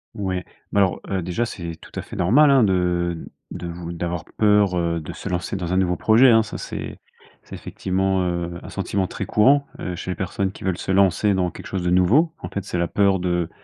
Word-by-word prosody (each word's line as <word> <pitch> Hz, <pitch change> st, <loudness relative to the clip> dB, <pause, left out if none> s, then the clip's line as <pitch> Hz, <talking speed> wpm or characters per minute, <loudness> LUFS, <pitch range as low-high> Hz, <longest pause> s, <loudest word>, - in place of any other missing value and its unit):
Ouais. 95 Hz, -4 st, -3 dB, 0.3 s
Mais 100 Hz, -, +2 dB
alors, 95 Hz, -2 st, +2 dB
heu, 95 Hz, -2 st, -1 dB
déjà 90 Hz, +7 st, -1 dB
c'est 85 Hz, -7 st, -6 dB
tout 80 Hz, -, -16 dB
à -, -, -2 dB
fait -, -, -10 dB
normal, 135 Hz, -, +5 dB
hein, 135 Hz, -4 st, +5 dB
de 90 Hz, -3 st, +1 dB, 0.3 s
de 85 Hz, -, -6 dB
vou 85 Hz, 0 st, -6 dB
d'avoir 85 Hz, 0 st, -4 dB
peur, 105 Hz, -3 st, +4 dB
heu, 85 Hz, -1 st, 0 dB
de 75 Hz, -, -7 dB
se 100 Hz, -, -7 dB
lancer 90 Hz, +2 st, -2 dB
dans 90 Hz, -2 st, -3 dB
un -, -, +2 dB
nouveau 90 Hz, -2 st, +2 dB
projet, 115 Hz, +8 st, +5 dB
hein. 110 Hz, -1 st, +5 dB
Ça 110 Hz, -, -7 dB
c'est -, -, -6 dB, 0.4 s
c'est -, -, -10 dB
effectivement, 95 Hz, 0 st, -1 dB
heu, 85 Hz, 0 st, -3 dB
un -, -, -10 dB
sentiment 95 Hz, -2 st, -2 dB
très -, -, -5 dB
courant, 140 Hz, +6 st, +4 dB
heu, 90 Hz, -1 st, -4 dB
chez 95 Hz, -, -5 dB
les -, -, -3 dB
personnes 95 Hz, +1 st, -2 dB
qui -, -, -12 dB
veulent 95 Hz, -2 st, -1 dB
se -, -, -3 dB
lancer 100 Hz, +1 st, +3 dB
dans 90 Hz, -2 st, 0 dB
quelque -, -, -10 dB
chose 95 Hz, -2 st, -3 dB
de 90 Hz, -, 0 dB
nouveau. 120 Hz, -, +4 dB
En -, -, -7 dB
fait, 100 Hz, -, -4 dB
c'est 90 Hz, -, -4 dB
la 85 Hz, -, +1 dB
peur 100 Hz, -2 st, +2 dB
de 85 Hz, -2 st, -1 dB
95 Hz, 235 wpm, -22 LUFS, 85-100 Hz, 0.4 s, normal